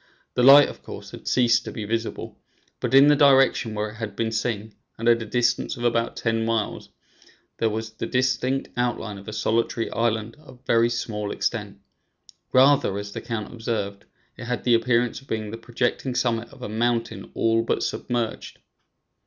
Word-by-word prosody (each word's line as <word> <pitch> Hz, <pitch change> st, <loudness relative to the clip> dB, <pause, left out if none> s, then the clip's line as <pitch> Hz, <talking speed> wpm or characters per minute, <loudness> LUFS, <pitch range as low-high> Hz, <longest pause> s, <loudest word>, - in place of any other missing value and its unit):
The -, -, +1 dB
light, 140 Hz, +3 st, +9 dB
of -, -, -10 dB
course, -, -, -9 dB
had -, -, -11 dB
ceased 120 Hz, -2 st, +3 dB
to -, -, -5 dB
be 110 Hz, -, -5 dB
visible, 115 Hz, +1 st, -4 dB, 0.4 s
but 125 Hz, +1 st, 0 dB
in 135 Hz, +1 st, +9 dB
the 150 Hz, -, +6 dB
direction 135 Hz, -5 st, +4 dB
where 105 Hz, 0 st, -2 dB
it -, -, -13 dB
had 105 Hz, -3 st, -5 dB
been 115 Hz, +1 st, -1 dB
seen, 110 Hz, -1 st, -2 dB, 0.2 s
and 115 Hz, -, -3 dB
at 120 Hz, 0 st, +4 dB
a 110 Hz, -, -6 dB
distance 120 Hz, +1 st, 0 dB
of 120 Hz, -, -6 dB
about 115 Hz, -1 st, +1 dB
ten 115 Hz, -1 st, 0 dB
miles, 115 Hz, -2 st, -2 dB, 0.7 s
there 115 Hz, -, +2 dB
was 110 Hz, +1 st, -4 dB
the 110 Hz, -, -5 dB
distinct 130 Hz, +1 st, 0 dB
outline 120 Hz, -4 st, -2 dB
of 100 Hz, -, -14 dB
a -, -, -5 dB
solitary 115 Hz, +2 st, -1 dB
island 115 Hz, +1 st, -1 dB
of 130 Hz, -4 st, -17 dB
very 115 Hz, 0 st, +3 dB
small 110 Hz, -3 st, -3 dB
extent; -, -, -3 dB, 0.7 s
rather, 130 Hz, -6 st, +4 dB
as 100 Hz, 0 st, -6 dB
the -, -, -6 dB
count 115 Hz, -2 st, -5 dB
observed, 105 Hz, -4 st, -4 dB, 0.3 s
it 125 Hz, -, -8 dB
had 120 Hz, -2 st, -3 dB
the 120 Hz, -, +3 dB
appearance 120 Hz, +1 st, +1 dB
of 135 Hz, -, -21 dB
being 110 Hz, -3 st, -3 dB
the 115 Hz, -, -6 dB
projecting 120 Hz, +2 st, -2 dB
summit 120 Hz, -2 st, 0 dB
of -, -, -13 dB
a -, -, -3 dB
mountain 115 Hz, +2 st, -1 dB
all 115 Hz, 0 st, +2 dB
but 115 Hz, -, -1 dB
submerged. 120 Hz, -3 st, -3 dB
115 Hz, 185 wpm, -24 LUFS, 110-125 Hz, 0.7 s, light